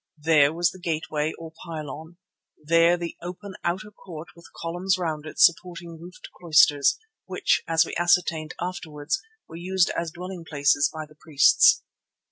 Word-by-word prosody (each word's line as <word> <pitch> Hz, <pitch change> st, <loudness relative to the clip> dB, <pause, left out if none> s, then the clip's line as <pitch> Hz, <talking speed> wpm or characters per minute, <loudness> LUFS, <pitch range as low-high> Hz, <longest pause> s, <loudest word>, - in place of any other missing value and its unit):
There 150 Hz, -2 st, +4 dB
was 170 Hz, +1 st, +1 dB
the 185 Hz, -, -13 dB
gateway 155 Hz, -2 st, -2 dB
or 165 Hz, -1 st, -10 dB
pylon; 160 Hz, 0 st, -8 dB, 0.4 s
there 165 Hz, +3 st, +3 dB
the 170 Hz, -1 st, -6 dB
open 185 Hz, +3 st, -8 dB
outer 185 Hz, +5 st, -3 dB
court 170 Hz, -5 st, -11 dB
with 170 Hz, 0 st, -16 dB
columns 175 Hz, +3 st, -2 dB
round 155 Hz, -4 st, -4 dB
it -, -, -10 dB
supporting 170 Hz, -1 st, +2 dB
roofed 175 Hz, +2 st, -12 dB
cloisters, 150 Hz, -4 st, +4 dB, 0.3 s
which, -, -, +1 dB
as 165 Hz, 0 st, +3 dB
we -, -, -7 dB
ascertained 175 Hz, -2 st, +1 dB
afterwards, 175 Hz, -, -4 dB, 0.3 s
were 165 Hz, -, -10 dB
used 185 Hz, +1 st, +1 dB
as 170 Hz, -1 st, -3 dB
dwelling 180 Hz, +1 st, -8 dB
places 145 Hz, -2 st, +2 dB
by 155 Hz, -1 st, -7 dB
the 150 Hz, -, -20 dB
priests. 155 Hz, -, +4 dB
165 Hz, 150 wpm, -24 LUFS, 155-175 Hz, 0.4 s, There